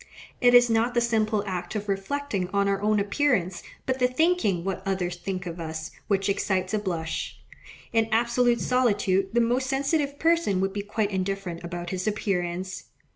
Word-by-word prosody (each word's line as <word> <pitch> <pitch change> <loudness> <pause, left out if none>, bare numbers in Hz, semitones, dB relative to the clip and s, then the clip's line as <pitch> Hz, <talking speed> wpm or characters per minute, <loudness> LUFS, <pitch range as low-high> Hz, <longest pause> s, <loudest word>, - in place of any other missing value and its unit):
It 245 -1 +6
is 245 0 +8
not 230 +2 +1
the - - +5
simple 220 -3 +1
act 180 0 -4
of 210 0 -3
reflecting 195 0 -2
on 200 0 +2
our 195 0 0
own 210 0 +2
appearance, 200 -5 +1 0.2
but 260 0 -1
the 250 - +4
thinking 255 - +1
what 190 0 -3
others 185 -3 -1
think 185 +1 -4
of 170 0 -6
us, 160 -1 -5 0.2
which 195 -1 +1
excites 190 -1 0
a 215 - +2
blush. 170 -5 -3 0.6
In 225 -1 +2
absolute 235 +1 +2
solitude 205 -6 +2
the 240 - +5
most 245 +3 +1
sensitive 280 +2 0
person 330 - +2
would 195 0 0
be 205 - -2
quite 210 0 -1
indifferent 190 -2 -3
about 175 0 -5
his 185 +1 -3
appearance. 185 -3 -2
200 Hz, 175 wpm, -26 LUFS, 185-240 Hz, 0.6 s, is